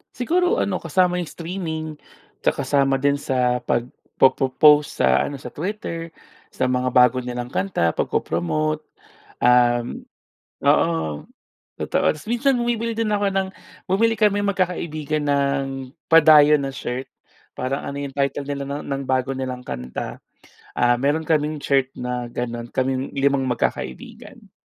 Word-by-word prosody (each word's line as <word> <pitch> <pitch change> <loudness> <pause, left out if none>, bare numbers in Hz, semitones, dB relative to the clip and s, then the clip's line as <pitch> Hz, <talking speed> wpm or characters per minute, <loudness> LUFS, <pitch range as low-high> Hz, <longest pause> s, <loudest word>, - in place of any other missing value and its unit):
Siguro 360 - +1
ano, - - 0
kasama 180 -2 +1
yung 175 - -2
streaming, 165 -1 -5 0.6
tsaka - - +2
kasama 135 -1 +1
din 140 0 +2
sa 125 -3 +1
pag-po-po-post 135 +4 +2
sa 65 0 +4
ano, 140 -2 -6
sa - - -7
Twitter, 165 -2 -5 0.4
sa 130 - 0
mga 125 0 0
bago 125 0 +5
nilang 125 -1 -4
kanta, 170 - 0
pagpo-promote, 80 -2 -1 0.6
um 120 -1 +3 0.6
oo. 80 -3 +1 0.5
Totoo. - - -1
Tapos 155 +8 -13
minsan 250 +3 +2
bumibili 235 -1 -1
din 225 -2 0
ako 205 -1 +1
ng 190 0 0 0.4
bumili 225 +5 +2
kaming 205 -1 +2
magkakaibigan 155 -6 -1
ng, 140 -2 -1 0.2
padayon 150 -2 +7
na 135 - -4
shirt. 130 0 -5 0.5
Parang 135 +2 -3
ano 140 - -5
yun, 140 -1 -5
title 140 0 -1
nila 140 -1 -3
no'n 140 +1 -4
ng 140 -1 -2
bago 130 0 +1
nilang 130 -1 -4
kanta, 60 - -5 0.6
ah, 120 0 +3
meron 145 +4 +1
kaming 155 -1 +1
shirt 135 -1 +2
na 125 -1 -4
gano'n. 120 -1 -4
Kaming 130 0 -1
limang 140 0 +2
magkakaibigan. 65 - -4
140 Hz, 135 wpm, -22 LUFS, 125-165 Hz, 0.6 s, padayon